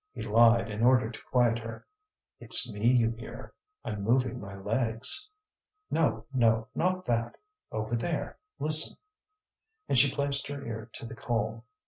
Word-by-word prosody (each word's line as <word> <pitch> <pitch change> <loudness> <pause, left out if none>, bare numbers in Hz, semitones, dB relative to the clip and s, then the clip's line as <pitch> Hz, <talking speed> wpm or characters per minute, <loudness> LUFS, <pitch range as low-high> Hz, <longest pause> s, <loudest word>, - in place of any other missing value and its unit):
He - - -6
lied 115 +1 +5
in 105 0 -4
order 125 -2 +4
to 110 - -9
quiet 120 -2 +3
her. 115 0 -8 0.5
"It's - - +2
me 105 +3 0
you 115 -3 +3
hear; 115 0 -9 0.3
I'm 105 -2 -4
moving 125 +3 +1
my 100 0 -8
legs." 115 - +1 0.6
"No, 130 -9 +1
no; 115 -2 +2
not 185 +1 0
that! 115 -1 -1 0.4
Over 110 +2 -2
there, 155 +7 -3 0.2
listen!" 155 +1 +2 0.9
And 125 - +4
she 135 +1 +5
placed 140 0 -1
her 140 -1 -6
ear 110 0 -6
to - - -8
the 115 - -8
coal. 115 -1 -2
115 Hz, 150 wpm, -29 LUFS, 110-130 Hz, 0.9 s, lied